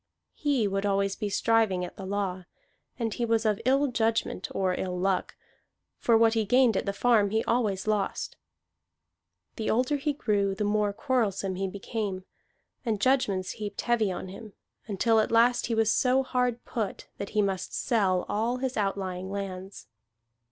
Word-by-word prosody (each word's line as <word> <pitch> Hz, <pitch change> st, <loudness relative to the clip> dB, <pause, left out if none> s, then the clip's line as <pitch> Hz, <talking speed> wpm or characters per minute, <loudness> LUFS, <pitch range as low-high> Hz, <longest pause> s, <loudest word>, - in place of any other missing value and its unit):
He 275 Hz, -8 st, +1 dB
would 195 Hz, 0 st, -1 dB
always 200 Hz, -1 st, +1 dB
be 210 Hz, -2 st, -3 dB
striving 210 Hz, -4 st, +2 dB
at -, -, -10 dB
the 190 Hz, -, -7 dB
law, 190 Hz, -2 st, -2 dB, 0.5 s
and 230 Hz, -4 st, -2 dB
he 240 Hz, -, -3 dB
was 230 Hz, -1 st, +1 dB
of 210 Hz, -2 st, +1 dB
ill 270 Hz, +3 st, +4 dB
judgment 225 Hz, -6 st, 0 dB
or 185 Hz, -1 st, 0 dB
ill 180 Hz, 0 st, -3 dB
luck, 190 Hz, +1 st, 0 dB, 0.6 s
for 230 Hz, -1 st, +4 dB
what 225 Hz, 0 st, +4 dB
he 225 Hz, -1 st, +2 dB
gained 245 Hz, +1 st, +4 dB
at -, -, -1 dB
the -, -, +2 dB
farm 210 Hz, -1 st, +3 dB
he 220 Hz, +2 st, +1 dB
always 215 Hz, -5 st, 0 dB
lost. 210 Hz, -2 st, -1 dB, 1.2 s
The 220 Hz, -, -2 dB
older 255 Hz, +5 st, +2 dB
he 295 Hz, +1 st, -1 dB
grew, 200 Hz, -7 st, 0 dB
the 210 Hz, -, -2 dB
more 210 Hz, 0 st, +1 dB
quarrelsome 200 Hz, -5 st, 0 dB
he 190 Hz, +1 st, -2 dB
became; 200 Hz, -1 st, -4 dB, 0.6 s
and 220 Hz, -4 st, -1 dB
judgments 210 Hz, -7 st, +1 dB
heaped 205 Hz, -1 st, -5 dB
heavy 225 Hz, -5 st, +1 dB
on 185 Hz, -, -5 dB
him, 205 Hz, +2 st, -10 dB, 0.3 s
until 220 Hz, +2 st, +2 dB
at 215 Hz, -, +1 dB
last 235 Hz, +2 st, +4 dB
he 230 Hz, -, 0 dB
was 225 Hz, 0 st, +3 dB
so 260 Hz, +1 st, +3 dB
hard 250 Hz, -2 st, -1 dB
put 215 Hz, -5 st, -4 dB
that 200 Hz, -, -4 dB
he 210 Hz, -, +5 dB
must 195 Hz, -2 st, -2 dB
sell 195 Hz, -7 st, +1 dB
all 230 Hz, +4 st, 0 dB
his 260 Hz, -1 st, -3 dB
outlying 190 Hz, -2 st, -2 dB
lands. 195 Hz, -1 st, -6 dB
210 Hz, 170 wpm, -28 LUFS, 195-235 Hz, 1.2 s, he